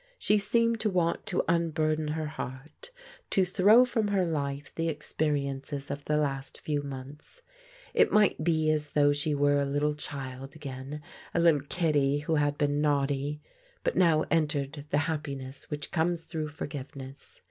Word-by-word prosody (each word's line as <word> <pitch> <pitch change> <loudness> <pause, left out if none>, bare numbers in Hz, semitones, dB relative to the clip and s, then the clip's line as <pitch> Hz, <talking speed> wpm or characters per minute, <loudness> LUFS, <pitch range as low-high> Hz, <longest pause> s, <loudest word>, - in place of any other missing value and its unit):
She 210 - +3
seemed 230 +2 +2
to 215 - +1
want 175 -3 0
to 185 - +1
unburden 155 -2 +1
her 155 +1 -2
heart, 145 - -8 0.4
to 190 - +3
throw 205 +7 +6
from 225 -4 0
her 195 -3 +2
life 145 -3 -3
the 165 0 -1
experi 150 -1 -1
ences 140 +1 -5
of 140 0 -5
the 150 - +1
last 135 -2 -2
few 145 -2 -1
months. 140 - -9 0.5
It - - +4
might 210 -6 +3
be 155 -2 +2
as 150 -1 -2
though 145 -1 +4
she 145 +1 0
were 145 0 +3
a - - +2
little 145 +2 0
child 135 -2 -7
again, 140 0 -7 0.3
a - - +3
little 165 -4 +5
kiddie 145 -5 +2
who 155 +2 -1
had 145 -1 +1
been 145 0 +1
naughty, 145 0 0 0.4
and - - +1
now 165 -4 +4
entered 150 -3 0
the 145 - +2
happiness 140 -4 -5
which 150 -1 -4
comes 165 0 0
through 155 -1 -4
forgiveness. 140 -2 -8
150 Hz, 165 wpm, -29 LUFS, 140-165 Hz, 0.5 s, throw